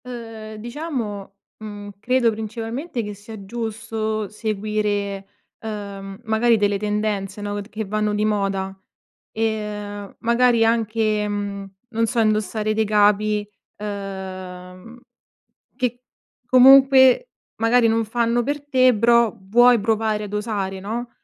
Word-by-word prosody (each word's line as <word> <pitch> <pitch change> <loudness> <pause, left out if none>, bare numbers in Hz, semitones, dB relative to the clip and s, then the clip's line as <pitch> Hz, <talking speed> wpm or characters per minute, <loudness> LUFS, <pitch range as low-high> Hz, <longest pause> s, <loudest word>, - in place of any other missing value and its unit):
Uhm, 225 -3 -8
diciamo 230 -5 -5 0.2
mhmm, 205 -1 -8
credo 245 +1 +2
principalmente 225 +6 -4
che 210 0 -5
sia 205 0 -11
giusto 220 -1 -3
seguire, 210 -2 -2 0.3
uhm, 200 -2 -7
magari 225 +1 +3
delle 205 -1 +1
tendenze 210 -1 -2
no, 205 0 -3
t 200 - -12
che 220 -1 -4
vanno 210 +1 -1
di 210 +1 +1
moda, 195 -2 -1 0.6
ehm 210 -2 -4
magari 235 0 +3
anche, 220 -2 +1
mhmm, 200 -1 -4 0.2
non 230 -1 0
so, 235 - -1
indossare 215 0 +1
dei 220 0 +1
capi, 210 0 +2 0.3
ehm, 190 0 -7 0.8
che 250 -1 -2 0.4
comunque 265 - +7 0.3
magari 230 +1 +4
non 225 0 +1
fanno 235 +2 0
per 285 +3 -3
te 255 -2 +4
però 235 0 +4
vuoi 240 +4 +5
provare 215 0 0
ad 205 0 -7
osare 205 -3 -2
no. 235 +5 -4
215 Hz, 120 wpm, -22 LUFS, 205-230 Hz, 0.8 s, comunque